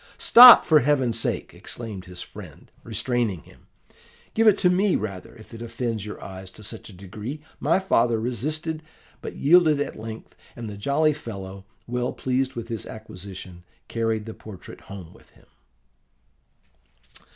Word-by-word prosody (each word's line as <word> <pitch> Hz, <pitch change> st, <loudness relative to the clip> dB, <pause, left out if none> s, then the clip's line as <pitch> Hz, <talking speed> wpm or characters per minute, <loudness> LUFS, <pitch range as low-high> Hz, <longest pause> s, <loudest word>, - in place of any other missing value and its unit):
"'Stop, 245 Hz, +1 st, +10 dB
for 155 Hz, -2 st, +6 dB
Heaven's 130 Hz, -4 st, +1 dB
sake!' -, -, -2 dB
exclaimed 105 Hz, -6 st, -8 dB
his 90 Hz, -1 st, -8 dB
friend, -, -, -13 dB
restraining 115 Hz, -4 st, -2 dB
him: -, -, -20 dB, 0.7 s
'give 225 Hz, 0 st, +3 dB
it 210 Hz, -2 st, +6 dB
to 185 Hz, -, +3 dB
me, 185 Hz, +2 st, +3 dB
rather, 100 Hz, -3 st, -5 dB
if 110 Hz, 0 st, -15 dB
it 115 Hz, -, -9 dB
offends 115 Hz, -2 st, -4 dB
your 105 Hz, -, -7 dB
eyes 95 Hz, 0 st, -9 dB
to 105 Hz, +3 st, -15 dB
such 110 Hz, +2 st, -8 dB
a -, -, -12 dB
degree.' 105 Hz, +9 st, -7 dB, 0.2 s
My -, -, +2 dB
father 120 Hz, -12 st, +2 dB
resisted, 155 Hz, +7 st, -2 dB, 0.4 s
but -, -, -7 dB
yielded 155 Hz, -1 st, +4 dB
at 145 Hz, -, -3 dB
length; 110 Hz, 0 st, -9 dB, 0.2 s
and 115 Hz, -1 st, -7 dB
the 105 Hz, -, -7 dB
jolly 140 Hz, +9 st, +2 dB
fellow, 100 Hz, -8 st, -8 dB, 0.2 s
well 125 Hz, +1 st, -2 dB
pleased 130 Hz, +1 st, -1 dB
with 115 Hz, -1 st, -5 dB
his 115 Hz, -2 st, -5 dB
acquisition, 95 Hz, -4 st, -10 dB, 0.2 s
carried 115 Hz, -2 st, -1 dB
the 110 Hz, -, -7 dB
portrait 105 Hz, -5 st, -12 dB
home 95 Hz, -4 st, -10 dB
with -, -, -21 dB
him. -, -, -23 dB
115 Hz, 155 wpm, -24 LUFS, 100-140 Hz, 0.7 s, Stop